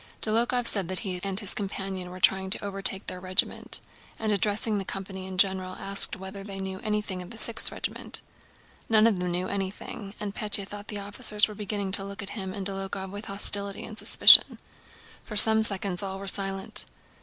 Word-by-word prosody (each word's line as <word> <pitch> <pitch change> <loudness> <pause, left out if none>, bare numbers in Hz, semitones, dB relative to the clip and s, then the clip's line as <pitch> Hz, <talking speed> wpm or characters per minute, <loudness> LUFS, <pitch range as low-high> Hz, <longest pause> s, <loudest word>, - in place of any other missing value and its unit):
Dólokhov 235 +3 +1
said 200 -6 0
that 185 0 -4
he 185 -4 -4
and 195 -1 -2
his 205 -3 +3
companion 195 -2 -5
were 185 +1 -10
trying 190 0 +2
to 205 - -2
overtake 195 -1 -1
their 180 - -7
regiment, 185 0 +3 0.4
and 220 -1 -3
addressing 210 +1 0
the - - -4
company 190 0 -7
in 190 -1 -8
general 185 -1 +1
asked 195 0 +4
whether 190 +1 -9
they 195 -1 -8
knew 190 0 -6
anything 210 -3 -3
of 180 - -11
the 230 - -10
6th 230 0 +5
Regiment. - - -4 0.7
None 220 -1 +4
of 215 -5 +2
them 180 0 -3
knew 180 +1 -3
anything, 200 +1 -6
and 205 -1 -5
Pétya 210 -3 +1
thought 205 0 -10
the 210 - -5
officers 205 +1 0
were 210 - -9
beginning 205 -1 -5
to 195 0 +8
look 200 0 -8
at 195 - -9
him 190 -3 -6
and 195 0 -6
Dólokhov 195 0 -5
with 205 +2 -8
hostility 200 0 0
and 220 - -10
suspicion. - - +6 0.7
For 210 - -8
some 220 +1 +5
seconds 195 -3 0
all 195 -1 -5
were 195 - -9
silent. 195 +2 0
195 Hz, 195 wpm, -26 LUFS, 190-210 Hz, 0.7 s, to